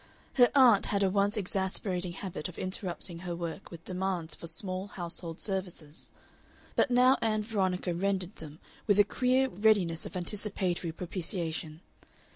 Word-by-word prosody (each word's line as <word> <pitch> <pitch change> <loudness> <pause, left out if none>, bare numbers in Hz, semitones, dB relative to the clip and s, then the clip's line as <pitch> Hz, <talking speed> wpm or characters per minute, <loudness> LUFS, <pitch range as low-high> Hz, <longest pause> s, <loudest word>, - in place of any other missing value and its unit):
Her 245 -2 +6
aunt 245 -7 +6
had 200 -1 +1
a 190 - +2
once 205 +2 +2
exasperating 190 -2 -1
habit 180 -4 -5
of 175 - -12
interrupting 185 -2 -3
her 175 -1 -4
work 170 +2 -6
with 170 -1 -11
demands 185 -3 -2
for 170 - -6
small 185 +3 -4
household 170 -3 -3
services, 180 -6 -3 0.6
but - - +3
now 255 +2 +5
Ann 215 -1 +1
Veronica 190 -4 -1
rendered 190 +1 -1
them 155 -1 -10 0.3
with 205 -2 +4
a 205 - +8
queer 255 +5 +2
readiness 200 -7 +2
of 185 - -6
anticipatory 185 -2 -2
propitiation. 165 -2 -3
185 Hz, 145 wpm, -30 LUFS, 170-205 Hz, 0.6 s, a